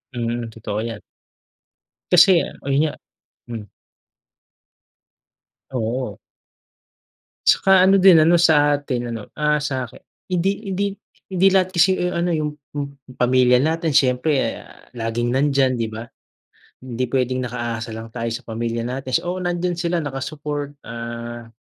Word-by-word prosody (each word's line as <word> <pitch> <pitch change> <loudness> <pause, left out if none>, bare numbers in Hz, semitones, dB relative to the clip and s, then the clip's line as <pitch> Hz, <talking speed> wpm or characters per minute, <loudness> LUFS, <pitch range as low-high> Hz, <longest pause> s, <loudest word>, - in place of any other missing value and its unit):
Mm, 120 0 -2
totoo 105 -2 -4
'yan. 115 -2 -5 1.1
Kasi 180 0 +7 0.2
ayun 140 +1 +1
nga - - -5 0.6
hmm. 110 -3 -6 2.0
Oo. 120 -3 -3 1.3
Tsaka 190 -1 +5
ano 195 - +6
din, 185 -3 +7
ano 165 +3 +5
sa 150 -4 +4
atin 130 -4 -3
ano, 115 -3 -7
ah, 150 0 +3
sa 130 -4 -2
aki - - -17 0.4
hindi 185 +3 +2 0.2
hindi 195 +1 -1 0.5
hindi 190 +1 +4
lahat 185 -1 +3
kasi, 185 +2 +5
eh, 180 0 0
ano, 170 0 0
yung 150 -1 -1
p 145 0 -30 0.4
pamilya 125 0 +4
natin, 165 +1 0
siyempre, 130 +2 +2
ah, - - -16
laging 120 0 -2
nandiyan, 135 -2 +2
'di 115 - 0
ba? 110 +1 -7 0.8
Hindi 130 -1 -4
pwedeng 130 -1 0
nakaasa 120 -2 -4
lang 110 +1 -7
tayo 115 -1 -2
sa 115 +3 -6
pamilya 115 +1 -3
natin, 130 +1 -5 0.2
oo, 180 +1 -2
nandiyan 175 0 -1
sila 170 0 -1
naka-support. 145 0 -5
Ah, 115 0 -7
130 Hz, 135 wpm, -21 LUFS, 120-165 Hz, 2.0 s, Kasi